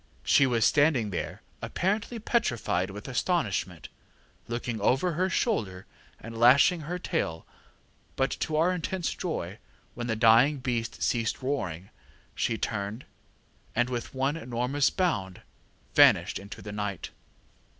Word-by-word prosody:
She 140 - +5
was 120 -3 +2
standing 145 -8 +3
there 90 - -5 0.2
apparently 205 +5 -1
petrified 120 - 0
with 105 +5 -8
astonishment, 115 - -1 0.6
looking 120 -2 -3
over 135 - +2
her 185 +4 0
shoulder, 105 - -1 0.3
and 115 0 -9
lashing 130 +9 +5
her 170 +4 -4
tail; 85 - -3 0.7
but 135 +1 +1
to 155 - -2
our 165 +4 +3
intense 180 0 -2
joy, 105 - -4 0.3
when 120 0 -5
the 110 - 0
dying 115 +6 +5
beast 120 -3 -3
ceased 115 +2 0
roaring, 95 - -3 0.4
she 115 - -1
turned, 105 +2 -3 0.7
and, 120 +2 +1
with 120 +1 -4
one 135 +3 0
enormous 125 +2 0
bound, 100 - -1 0.5
vanished - - +5
into 100 +1 -10
the 105 - -7
night. 105 -3 -4
120 Hz, 130 wpm, -28 LUFS, 105-155 Hz, 0.7 s, She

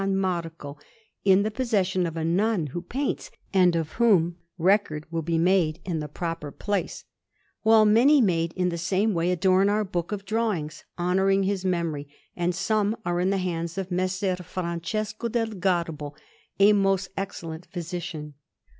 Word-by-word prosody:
Marco, 170 -6 -2 0.4
in 195 0 +5
the 215 - -1
possession 195 -7 0
of 165 0 -6
a 160 - -1
nun 190 +1 +1
who 175 - -3
paints, 275 - -3 0.2
and 180 -3 +4
of 160 -2 -1
whom 185 -8 +3 0.2
record 175 -4 +2
will 165 -1 -1
be 165 +1 -1
made 170 -2 +2
in 170 -4 -2
the 150 - -4
proper 165 -1 -4
place; 205 +6 -3 0.6
while 220 -1 +6
many 245 +8 +6
made 170 -7 +2
in 180 -1 0
the 170 -1 -3
same 195 +5 +1
way 170 0 +1
adorn 185 +2 +3
our 210 +1 +2
book 175 -2 -3
of 200 -1 -4
drawings, 200 -8 -2
honouring 190 +2 +2
his 195 -1 -1
memory, 170 -6 -1 0.3
and 175 0 0
some 215 +3 +1
are 175 0 0
in 180 +1 +2
the 200 - +1
hands 170 -2 -3
of 190 -1 -4
Messer 185 +1 0
Francesco 185 +6 -3
del 225 -1 0
Garbo, 170 -6 -1 0.5
a 205 +1 +7
most 195 -1 +2
excellent 170 -4 -6
physician. 170 -4 -6
185 Hz, 160 wpm, -26 LUFS, 170-200 Hz, 0.6 s, a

